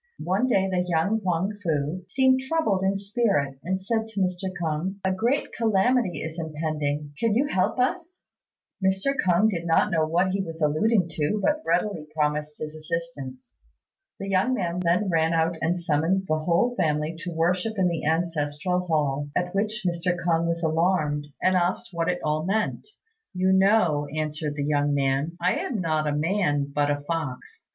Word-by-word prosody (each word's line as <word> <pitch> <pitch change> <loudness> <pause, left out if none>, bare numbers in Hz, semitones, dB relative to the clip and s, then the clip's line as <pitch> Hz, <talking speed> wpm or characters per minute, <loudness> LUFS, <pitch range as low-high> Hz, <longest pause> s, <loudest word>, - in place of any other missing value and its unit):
One 195 +8 +1
day 195 -6 +2
the 185 -1 0
young 180 +5 +1
Huang 190 +1 -1
fu 160 0 -1
seemed 260 +5 +3
troubled 265 -9 0
in 195 +1 +1
spirit, 195 - 0
and 185 +3 -1
said 220 +3 -1
to 220 -2 -5
Mr. 185 0 -1
K'ung, 165 +3 -2
"A 190 - +2
great 235 +9 0
calamity 220 - +1
is 160 +1 -5
impending. 150 -2 -3
Can 225 -2 +1
you 265 +5 +3
help 190 -5 0
us?" 345 +8 -1 0.6
Mr. 190 +8 +2
K'ung 185 +3 +4
did 170 -5 -2
not 165 +5 +3
know 160 -2 +2
what 175 +4 +2
he 195 +1 0
was 165 -3 -6
alluding 175 +6 +2
to, 155 +6 -1
but 300 +1 +2
readily 175 -2 0
promised 150 0 -1
his 155 0 -5
assistance. 155 -5 -5 0.7
The 195 - -5
young 195 +7 +2
man 175 -4 -2
then 180 +3 +1
ran 165 -2 +2
out 165 +1 +1
and 175 +2 0
summoned 170 +3 +1
the 155 0 +1
whole 170 +10 +2
family 155 -2 0
to 175 +1 -5
worship 180 +6 0
in 185 -1 +3
the 170 -3 -2
ancestral 160 +1 0
hall, 145 -5 -1
at 180 0 -1
which 215 +1 -1
Mr. 175 +1 0
K'ung 170 -1 +1
was 170 0 -1
alarmed, 160 -3 +1 0.2
and 185 0 +4
asked 180 0 0
what 170 -1 -1
it 180 - 0
all 155 0 0
meant. 205 +4 -1 0.5
"You 185 +1 +2
know," 190 -7 +3
answered 155 -1 -2
the 145 - -2
young 145 -1 +1
man, 140 +4 0
"I - - +1
am 235 -6 -2
not 155 -3 0
a - - +1
man 150 -4 0
but 145 0 +1
a 145 0 0
fox. 145 -4 -5
175 Hz, 175 wpm, -25 LUFS, 155-195 Hz, 0.7 s, K'ung